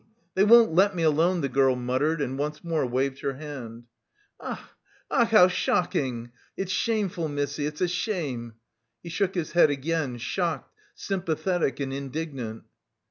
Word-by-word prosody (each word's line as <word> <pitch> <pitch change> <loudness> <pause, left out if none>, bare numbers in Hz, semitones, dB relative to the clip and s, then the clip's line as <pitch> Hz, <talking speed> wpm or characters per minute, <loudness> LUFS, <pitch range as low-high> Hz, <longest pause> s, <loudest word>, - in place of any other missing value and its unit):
They 190 - +3
won't 230 -3 +7
let 195 +3 +4
me 170 - -1
alone," 165 +3 +3
the 140 - 0
girl 135 -1 +3
muttered, 130 +6 0
and 135 -1 -2
once 150 +2 -3
more 165 -5 0
waved 130 +2 -1
her 140 - -2
hand. 130 -5 -8 0.6
"Ach, - - -4 0.5
ach, 235 -4 +4
how 215 -5 +7
shocking! 130 -9 -1 0.3
It's 190 -1 -3
shameful, 195 -7 0
missy, 145 0 -2
it's 150 0 -7
a 180 - +3
shame!" 155 - -3 0.5
He 170 - -7
shook 190 +3 -1
his 170 -3 -2
head 170 -3 +5
again, 145 -2 -1
shocked, 165 +7 -2 0.2
sympathetic 175 -4 -1
and 135 -1 -3
indignant. 135 -5 -5
150 Hz, 150 wpm, -26 LUFS, 135-180 Hz, 0.6 s, won't